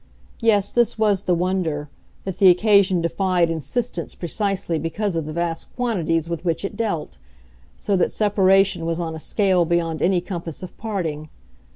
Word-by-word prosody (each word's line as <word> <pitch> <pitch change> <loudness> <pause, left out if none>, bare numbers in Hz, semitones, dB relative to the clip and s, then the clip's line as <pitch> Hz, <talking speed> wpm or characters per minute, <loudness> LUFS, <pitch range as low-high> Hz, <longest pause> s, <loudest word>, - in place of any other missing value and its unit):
Yes, 205 -4 +2
this 240 -1 +1
was 210 -3 +2
the 180 - +1
wonder, 170 -4 -1 0.4
that 190 -2 -5
the 190 - +8
occasion 195 -1 +4
defied 175 0 +1
insistence 170 - -3
precisely 190 -2 -2
because 175 +4 -2
of 160 -2 -2
the - - -4
vast 170 0 -3
quantities 170 -10 0
with 170 -1 -4
which 170 +2 -1
it 195 - -5
dealt 205 -8 -3 0.6
so 200 - 0
that 180 - +1
separation 195 -4 +2
was 165 0 -1
on 165 -2 -3
a 160 - -6
scale 190 +1 +2
beyond 165 -1 -1
any 185 0 +3
compass 175 -2 -6
of 180 - -9
parting. 165 -9 -4
180 Hz, 165 wpm, -22 LUFS, 165-200 Hz, 0.6 s, the